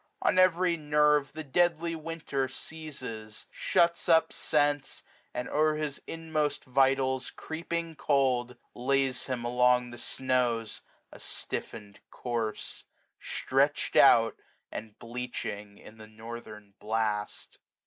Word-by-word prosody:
On 185 - +3
every 180 -1 +4
nerve 150 -1 +3
The 155 +1 -5
deadly 170 +2 +1
winter 155 -4 -3
seizes; 130 -7 -8
shuts 170 0 +1
up 160 -1 +5
sense; 145 -2 0 0.3
And, 125 - -4
o'er 155 +1 +2
his 150 -2 -3
inmost 160 -2 -2
vitals 130 0 +2
creeping 165 0 -4
cold. 125 -5 +1 0.2
Lays 135 +1 0
him 125 -3 -3
along 125 0 +3
the 120 - -9
snows, 125 -4 -1 0.3
a - - -12
stiffened 105 -1 -6
corse; 115 -3 -4 0.4
320 - - +1
Stretched - - -4
out, - - +6 0.3
and 110 -1 -7
bleaching 115 -4 -5
in 110 +1 -14
the 110 - -10
northern 110 -2 -10
blast. 105 -1 -2
130 Hz, 115 wpm, -29 LUFS, 115-155 Hz, 0.4 s, out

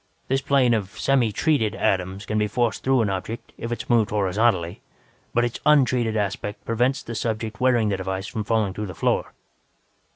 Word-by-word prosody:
This 135 +1 +1
plane 135 -4 +3
of 100 -4 -2
'semi 130 -5 +2
treated' 115 -3 +1
atoms 95 +1 -1
can 110 0 -1
be 105 - +1
forced 120 -1 -1
through 130 -2 +3
an 105 -3 0
object, 110 +5 -5
if 115 - -6
it 120 - -3
is - - -22
moved 115 -3 +3
horizontally, 100 -3 +1 0.5
but 120 0 +2
its 120 - -4
'untreated' 125 -6 +3
aspect 105 0 -3
prevents 125 +4 0
the 115 - -6
subject 110 0 -3
wearing 120 -4 +3
the 100 - 0
device 95 +1 -3
from 110 +1 -4
falling 105 -2 0
through 105 +1 -4
the 90 - -8
floor. - - 0
110 Hz, 190 wpm, -24 LUFS, 100-120 Hz, 0.5 s, plane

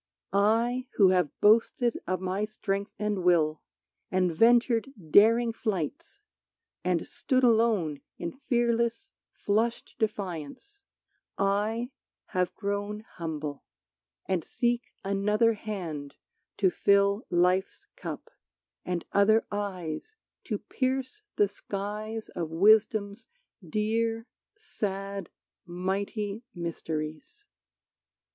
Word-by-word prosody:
I, 230 +5 +2
who 195 -3 +6
have 180 -5 +3
boasted 230 +3 +4
of 185 -1 0
my 190 +2 -1
strength 200 -1 -2
and 210 -3 -1
will, 160 -3 +3 0.5
And 185 -2 +1
ventured 235 - +4 0.2
daring 230 +4 +6
flights, 195 -9 -3 0.6
and 180 -2 +1
stood 260 -1 0
alone 220 - +3 0.2
In 170 - -4
fearless, 240 +5 0 0.2
flushed 225 +3 -1
defiance, 205 - -4 0.6
I 210 +5 0 0.4
have 180 -3 0
grown 205 +1 -3
Humble, 155 -7 -6 0.6
and 185 -4 0
seek 240 0 -1
another 210 +3 +2
hand 170 -10 -5 0.4
to 190 -3 +3
fill 200 +3 +3
Life's 180 +2 +1
cup, - - -7 0.5
and 180 -2 -3
other 215 +3 +4
eyes 200 - -4 0.3
to - - -1
pierce 260 +8 -2
the 205 - +4
skies 210 +2 -5
Of 170 -3 -4
Wisdom's 205 +4 +3 0.4
dear, 225 +1 0 0.3
sad, 195 - -4 0.4
mighty 200 +4 -2
mysteries. 165 - -5
205 Hz, 95 wpm, -28 LUFS, 185-230 Hz, 0.6 s, who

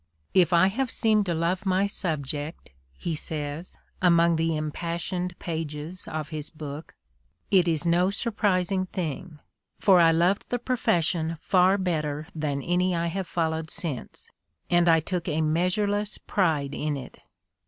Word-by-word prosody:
"If 185 -1 +4
I 170 +1 +6
have 255 +5 -1
seemed 215 -3 +2
to 170 - 0
love 170 +4 0
my 190 0 +2
subject," 155 - -4 0.2
he 115 - -4
says, 150 +2 -5 0.2
among 170 -2 +5
the 165 0 0
impassioned 170 +3 -3
pages 160 +1 -5
of 155 -1 -4
his 155 -1 -5
book, 150 -1 -8 0.6
"it 185 -3 +5
is 165 -1 +1
no 175 +2 +3
surprising 195 -3 0
thing, 170 -2 -4 0.4
for 190 -3 +6
I 165 -1 +7
loved 175 +5 +2
the 245 - 0
profes 240 -8 +1
sion 160 0 -1
far 185 +3 +4
better 155 -5 -1
than 145 -3 -2
any 180 +1 +1
I 170 0 0
have 190 -2 -3
followed 160 -2 -1
since, 150 -7 -5 0.4
and 175 0 +4
I 165 -1 +5
took 175 +1 -3
a 155 -1 0
measureless 200 +6 0
pride 155 -8 0
in 150 0 -2
it." 130 - -10
170 Hz, 150 wpm, -26 LUFS, 155-185 Hz, 0.6 s, I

